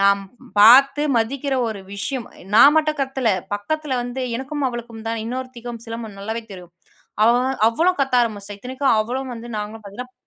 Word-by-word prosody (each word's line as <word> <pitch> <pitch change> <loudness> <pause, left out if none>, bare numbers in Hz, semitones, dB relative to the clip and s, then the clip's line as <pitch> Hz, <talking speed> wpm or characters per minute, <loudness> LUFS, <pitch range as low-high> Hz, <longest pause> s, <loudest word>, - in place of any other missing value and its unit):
நான் 200 0 +4 0.4
பார்த்து 270 +7 +7
மதிக்கிற 270 +5 -1
ஒரு 215 -3 -5
விஷயம், 240 +4 -4 0.3
நான் 280 +7 +8
மட்டும் 310 -1 +1
கத்தல, 265 -3 0 0.2
பக்கத்துல 290 +6 -2
வந்து 245 +2 -4
எனக்கும் 280 +3 -4
அவளுக்கும் 235 -2 -8
தான் 225 -1 -2
இன்னொருத்திக்கும் 240 -1 -6
சிலம்ப 225 -2 -6
நல்லாவே 220 +3 -4
தெரியும், 180 -2 -11 0.5
அவ 230 - +6
வ - - +1 0.3
அவ்வளோ 330 +11 +2
கத்த 270 -2 0
ஆரம்பிச்சிட்டா, 205 -3 -4
இத்தனைக்கும் 260 +2 0
அவளும் 255 +4 -3
வந்து 235 +1 -9
நாங்களும் 210 +1 -6
பார்த்தீங்கன்னா 250 +6 -9
240 Hz, 160 wpm, -21 LUFS, 220-265 Hz, 0.5 s, நான்